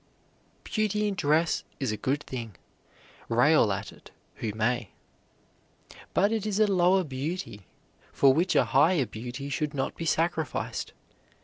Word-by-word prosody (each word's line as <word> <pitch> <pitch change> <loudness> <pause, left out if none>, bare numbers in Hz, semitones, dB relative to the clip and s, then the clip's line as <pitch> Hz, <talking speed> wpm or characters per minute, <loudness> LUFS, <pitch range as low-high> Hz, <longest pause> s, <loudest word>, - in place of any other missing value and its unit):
Beauty 210 -1 0
in 205 - -1
dress 160 -1 +1 0.2
is 135 -5 -1
a - - -1
good 140 +6 -1
thing, 115 -6 -7 0.7
rail - - +4
at - - -4
it - - -16 0.3
who 110 - -3
may. 115 -1 0 1.3
But 200 +3 +3
it 220 -3 -1
is 210 -1 -1
a 215 - +6
lower 185 -1 +3
beauty, 140 - -5 0.4
for 135 -1 +5
which 175 +6 +1
a 125 - +5
higher 140 +5 +3
beauty 120 +5 -7
should 145 +2 -2
not 135 - -2
be 165 - -5
sacrificed. 160 0 -1
150 Hz, 140 wpm, -27 LUFS, 125-185 Hz, 1.3 s, a